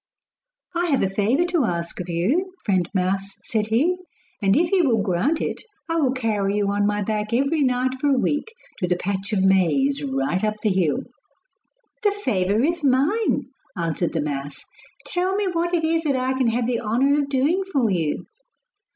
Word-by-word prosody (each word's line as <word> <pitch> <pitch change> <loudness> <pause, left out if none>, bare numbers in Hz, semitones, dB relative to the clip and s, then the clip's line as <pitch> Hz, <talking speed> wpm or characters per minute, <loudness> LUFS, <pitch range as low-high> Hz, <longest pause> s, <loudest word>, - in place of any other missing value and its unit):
'I 345 +1 +1
have 280 -5 +2
a 190 - +1
favour 225 - +2
to 350 -4 +1
ask 170 -3 -3
of 180 0 -5
you, 280 - 0
friend 185 -5 +1
mouse,' 195 +1 -1
said 215 -2 -1
he, 290 +12 +2 0.4
'and 195 -1 +3
if 335 +2 +2
you 380 -3 +4
will 225 -6 +2
grant 205 - +1
it - - -2 0.3
I 330 - +1
will 280 -6 +2
carry 215 -6 0
you 200 -1 +1
on 205 0 +1
my 205 0 0
back 210 +1 -2
every 275 +5 +2
night 255 -1 +1
for 290 - +2
a 275 -2 +3
week 295 - 0 0.3
to 180 - 0
the 180 - +2
patch 195 +3 -2
of 195 -3 +1
maize 195 - +3
right 270 -7 -1
up 215 0 +1
the 215 - +3
hill.' 175 -6 +1 1.0
'The 415 - +3
favour 215 - 0
is 335 +2 0
mine,' 285 - +2 0.3
answered 170 0 -1
the 160 - 0
mouse. 145 -1 -5 0.4
'Tell 365 +2 0
me 405 -1 0
what 340 +1 0
it 345 -2 +1
is 325 +1 +2
that 280 -3 +2
I 260 0 0
can 260 -2 +1
have 230 +1 +1
the 240 -1 -1
honour 260 +6 +2
of 280 -1 -1
doing 285 +8 +2
for 250 - +2
you. 165 -5 -1
240 Hz, 195 wpm, -23 LUFS, 195-290 Hz, 1.0 s, you